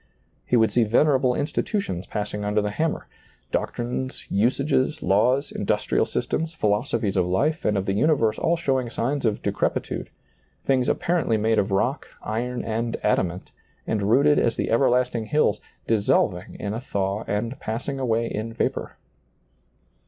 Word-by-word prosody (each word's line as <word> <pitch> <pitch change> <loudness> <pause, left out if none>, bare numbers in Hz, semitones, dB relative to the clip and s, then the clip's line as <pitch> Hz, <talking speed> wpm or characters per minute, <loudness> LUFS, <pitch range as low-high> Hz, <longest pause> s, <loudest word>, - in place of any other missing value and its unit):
He - - +2
would 110 -2 +4
see 120 - +4
venerable 130 +2 +3
institutions 145 - -2
passing 105 0 -3
under 105 +1 +1
the 105 0 -1
hammer; 160 +9 -1 0.5
doctrines, 125 +2 -3
usages, 130 +7 +1
laws, 125 +9 +2
industrial - - 0
systems, 160 0 -2
phi 110 - +1
losophies 105 -1 0
of 90 -2 +2
life 150 - +1
and 105 - +2
of 95 - -1
the 95 - 0
universe 115 -2 +2
all 170 +1 +2
showing 130 -6 0
signs 135 +3 -1
of 110 -2 0
decrepitude, - - -1 0.6
things 130 -2 +2
apparently 165 -10 +1
made 110 +1 +2
of 95 - 0
rock, 105 +9 0 0.2
iron 120 +3 -2
and 115 +1 -2
adamant, 90 -3 0 0.3
and 105 -2 -1
rooted 145 +5 +5
as 115 - +1
the - - -2
ever 125 +3 +4
lasting 125 -2 +1
hills, 150 -7 +2 0.2
dissolving 100 -3 +1
in 100 0 -3
a 115 - -4
thaw 100 -4 -2
and 115 +6 -2
passing 120 +5 -4
away 115 -3 +1
in 115 0 -4
vapor. - - -2
115 Hz, 150 wpm, -24 LUFS, 105-135 Hz, 0.6 s, rooted